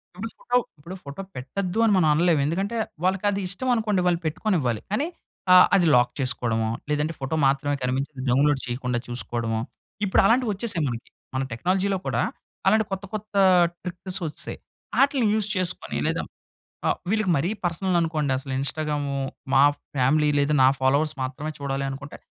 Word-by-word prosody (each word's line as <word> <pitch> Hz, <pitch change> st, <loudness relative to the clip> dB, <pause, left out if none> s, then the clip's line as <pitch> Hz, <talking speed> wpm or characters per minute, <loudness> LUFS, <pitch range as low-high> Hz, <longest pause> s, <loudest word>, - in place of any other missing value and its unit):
ఇప్పుడు 205 Hz, +5 st, -5 dB
ఫోటో, 245 Hz, 0 st, +1 dB, 0.2 s
ఇప్పుడు 170 Hz, +6 st, -8 dB
ఫోటో 140 Hz, +6 st, -7 dB
పెట్టొద్దు 180 Hz, -, -3 dB
అని 220 Hz, -, +4 dB
మనం 160 Hz, -4 st, +4 dB
అనలేం. 165 Hz, 0 st, +3 dB
ఎందుకంటే 195 Hz, +9 st, -1 dB, 0.3 s
వాళ్ళకది 195 Hz, +2 st, +1 dB
ఇష్టం 195 Hz, +8 st, -4 dB
అనుకోండి, 210 Hz, -4 st, +1 dB
వాళ్ళు 170 Hz, -1 st, +2 dB
పెట్టుకొనివ్వాలి. 155 Hz, -, 0 dB
కానీ 275 Hz, +10 st, 0 dB, 0.5 s
ఆహ్, 180 Hz, -, +9 dB
అది 180 Hz, -3 st, +4 dB
లాక్ 125 Hz, 0 st, +4 dB
చేసుకోవడమో, 115 Hz, -4 st, 0 dB, 0.2 s
లేదంటే 150 Hz, +2 st, 0 dB
ఫోటో 135 Hz, +4 st, -2 dB
మాత్రమే 140 Hz, +1 st, +1 dB
కనిపించింది 130 Hz, +2 st, -2 dB
డౌన్‌లోడ్ 140 Hz, +2 st, +3 dB
చేయకుండా 125 Hz, 0 st, -2 dB
చూసుకోవడమో, 115 Hz, -2 st, -2 dB, 0.5 s
ఇప్పుడు 190 Hz, -, +4 dB
అలాంటివి 235 Hz, +2 st, +3 dB
వచ్చేసాయి 195 Hz, -5 st, -1 dB
మనకి. 120 Hz, -1 st, -5 dB, 0.3 s
మన 135 Hz, -, 0 dB
టెక్నాలజీలో 190 Hz, +9 st, 0 dB
కూడా -, -, +1 dB, 0.5 s
అలాంటి 220 Hz, -1 st, +4 dB
కొత్త, 195 Hz, 0 st, -3 dB
కొత్త 215 Hz, 0 st, -6 dB, 0.5 s
ట్రిక్స్ 180 Hz, +1 st, -4 dB
వచ్చేసాయి. 155 Hz, -, -3 dB, 0.4 s
ఆటిల్ని 275 Hz, -4 st, +3 dB
యూజ్ 215 Hz, -2 st, 0 dB
చేసుకొని 185 Hz, -1 st, -2 dB
లేదా -, -, 0 dB, 0.7 s
ఆహ్, -, -, +1 dB
వీళ్ళకి 215 Hz, -4 st, +1 dB
మరీ 160 Hz, +7 st, 0 dB, 0.2 s
పర్సనల్ 175 Hz, +1 st, 0 dB
అనుకోండి, 155 Hz, -4 st, 0 dB
అసలు 135 Hz, 0 st, -7 dB
ఇన్‌స్టాగ్రాము, 145 Hz, 0 st, -2 dB, 0.4 s
మా 135 Hz, +1 st, +7 dB, 0.3 s
ఫ్యామిలీ 150 Hz, +4 st, +3 dB
లేదు, 145 Hz, +1 st, +2 dB
నా 130 Hz, -, +7 dB
ఫాలోవర్స్ 140 Hz, +4 st, +2 dB
మాత్రమే 145 Hz, +4 st, -4 dB
చూడాలి 135 Hz, -1 st, -2 dB
అనుకుంటే 140 Hz, +2 st, -8 dB
155 Hz, 155 wpm, -25 LUFS, 135-195 Hz, 0.7 s, ఆహ్